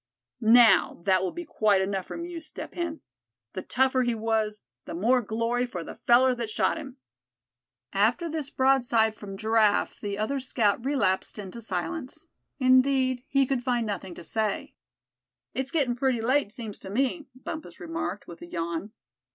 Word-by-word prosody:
Now, 225 -6 +5
that 190 -1 +3
will 185 - -1
be 345 - -6
quite 210 -8 +2
enough 190 -1 -2
from 335 - -5
you, 345 -1 -6
Step 310 -1 -8
Hen. 335 -2 -4 0.5
The 185 - -4
tougher 260 +3 +2
he 240 -2 +1
was, 220 -1 -1 0.2
the - - -6
more 240 +8 +3
glory 230 +3 -1
for 180 -8 -5
the - - -8
feller 255 +2 +4
that 235 -3 -4
shot - - +1
him." 270 -2 -9 1.0
After 340 - +2
this 310 -3 -3
broadside 245 -5 +3
from 195 -2 -8
Giraffe 220 -1 +2
the 200 -1 -4
other 245 +7 -1
scout 235 -4 +1
relapsed 255 -11 0
into 205 +3 -7
silence; 250 - -5 0.3
indeed, 255 -1 +3
he 275 -1 +3
could 260 -1 -1
find 245 -2 0
nothing 190 -4 -5
to - - -10
say. 215 +1 -2 0.8
"It's 265 0 -2
gettin' 280 -7 +1
pretty 255 -1 +1
late, 255 0 +1
seems 220 -3 -7
to 190 - -9
me," 270 - -1
Bumpus 310 +4 -8
remarked, 325 - -4
with 170 -1 -11
a 175 - -8
yawn. 170 +4 -4
235 Hz, 165 wpm, -27 LUFS, 205-265 Hz, 1.0 s, Now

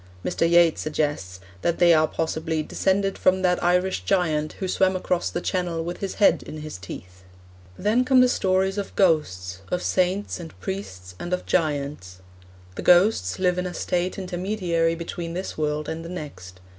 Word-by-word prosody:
Mr. 165 -1 +1
Yeats 170 -1 +4
suggests 145 -12 -2 0.2
that 170 - 0
they 175 -1 +6
are 155 -1 +4
possibly 160 0 -2
'descended 195 +4 0
from 185 0 +3
that 180 -1 +2
Irish 180 +2 +1
giant 155 -5 0
who 190 - -4
swam 190 +1 +2
across 180 -1 -1
the 175 - -3
Channel 175 -4 -1
with 175 +1 -5
his 195 -2 -4
head 205 - +4
in 155 - -8
his 155 -10 -7
teeth.' 90 -1 -10 0.5
Then 220 +5 +2
come 255 0 +4
the 255 - +6
stories 190 -3 +1
of 200 - -6
ghosts, 95 - +1
of 180 - -1
saints 185 +2 0
and 165 -2 -10
priests, 95 - -6
and 175 - -4
of 180 - -2
giants. 140 - -1 0.6
The - - -6
ghosts 175 - +4
live 180 -1 +1
in 180 - -2
a 175 - -7
state 180 +2 -1
intermediary 180 -3 -1
between 170 0 -5
this 185 +2 -4
world 150 0 -2
and 160 +1 -4
the 165 - -8
next. 95 - -8
175 Hz, 175 wpm, -24 LUFS, 155-185 Hz, 0.6 s, they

